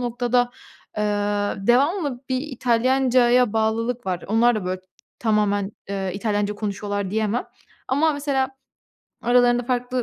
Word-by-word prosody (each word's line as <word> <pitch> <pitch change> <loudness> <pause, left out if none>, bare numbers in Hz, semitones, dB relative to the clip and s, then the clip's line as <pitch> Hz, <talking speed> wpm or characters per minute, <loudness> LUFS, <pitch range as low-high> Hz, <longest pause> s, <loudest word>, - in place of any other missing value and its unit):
noktada, 245 0 +1 0.5
eee, 210 - 0 0.6
devamlı 275 +1 +2
bir 260 -1 0
İtalyancaya 250 -2 +2
bağlılık 225 +2 -1
var. 180 -2 -2
Onlar 235 +3 +4
da, 210 -4 -3
böyle, 185 0 -3 0.4
tamamen, 210 -2 +1 0.2
eee, 195 -1 -2
İtalyanca 205 0 -1
konuşuyorlar 205 -1 -3
diyemem 220 +2 0 0.4
ama 305 +4 +2
mesela 280 -2 0 0.7
aralarında 245 0 +4
farklı 250 0 -1
240 Hz, 115 wpm, -23 LUFS, 210-250 Hz, 0.7 s, Onlar